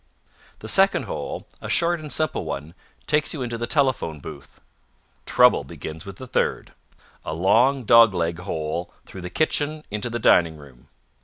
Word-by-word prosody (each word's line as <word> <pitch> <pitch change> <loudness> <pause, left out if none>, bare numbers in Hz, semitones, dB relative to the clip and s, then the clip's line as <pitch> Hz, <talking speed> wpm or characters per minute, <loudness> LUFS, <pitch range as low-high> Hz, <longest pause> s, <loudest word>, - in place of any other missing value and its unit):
The - - -7
second 195 0 +3
hole, - - -5 0.2
a - - -6
short 170 0 +2
and 150 -2 -8
simple 155 -2 -1
one, 75 +4 -6 0.3
takes 150 +1 +1
you 135 - -3
into 120 -1 -4
the 120 - -2
telephone 130 - 0
booth. - - -11 0.7
Trouble - - +5
begins 80 +3 -8
with 100 - -8
the 130 - -9
third, - - -1 0.5
a 80 - -4
long 125 +10 +3
dog 115 -2 +6
leg 85 0 -1
hole 85 -1 -4
through 95 - -10
the 90 - -6
kitchen 155 - -1
into 105 +3 -3
the 120 - -3
dining 85 -7 +3
room. 70 -5 -16
110 Hz, 165 wpm, -23 LUFS, -, 0.7 s, dog